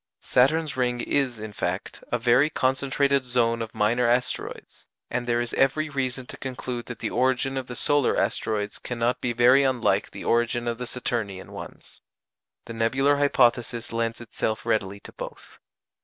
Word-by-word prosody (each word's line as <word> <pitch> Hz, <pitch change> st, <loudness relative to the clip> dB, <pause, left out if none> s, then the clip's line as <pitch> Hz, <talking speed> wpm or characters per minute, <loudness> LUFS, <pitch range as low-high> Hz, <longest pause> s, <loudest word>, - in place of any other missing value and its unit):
Saturn's 150 Hz, +4 st, +2 dB
ring 125 Hz, -1 st, 0 dB
is, 130 Hz, -2 st, 0 dB
in 110 Hz, -1 st, -7 dB
fact, -, -, -4 dB
a 120 Hz, -, +2 dB
very 125 Hz, +5 st, +4 dB
concentrated 140 Hz, 0 st, +1 dB
zone 120 Hz, -2 st, +1 dB
of 115 Hz, -1 st, -6 dB
minor 120 Hz, +4 st, +2 dB
asteroids, 125 Hz, +1 st, -2 dB, 0.2 s
and 125 Hz, 0 st, -2 dB
there 120 Hz, 0 st, +2 dB
is 120 Hz, 0 st, -2 dB
every 150 Hz, +3 st, +1 dB
reason 130 Hz, -2 st, -2 dB
to -, -, -9 dB
conclude 125 Hz, -2 st, -5 dB
that 120 Hz, -, -6 dB
the -, -, -3 dB
origin 130 Hz, +1 st, +1 dB
of 130 Hz, -1 st, -3 dB
the 125 Hz, -, -7 dB
solar 145 Hz, 0 st, +2 dB
asteroids 105 Hz, -1 st, -1 dB
cannot 120 Hz, 0 st, -1 dB
be 125 Hz, -, 0 dB
very 125 Hz, +3 st, +5 dB
unlike 130 Hz, -3 st, +1 dB
the -, -, -9 dB
origin 120 Hz, 0 st, +1 dB
of 120 Hz, 0 st, -2 dB
the 125 Hz, -, -4 dB
Saturnian 110 Hz, -7 st, -3 dB
ones. -, -, -11 dB, 0.6 s
The 115 Hz, -, -7 dB
nebular 135 Hz, +6 st, +2 dB
hypothesis 120 Hz, -4 st, +2 dB
lends 115 Hz, 0 st, -1 dB
itself 110 Hz, -1 st, -3 dB
readily 100 Hz, -2 st, 0 dB
to -, -, -12 dB
both. -, -, -9 dB
125 Hz, 165 wpm, -25 LUFS, 115-130 Hz, 0.6 s, very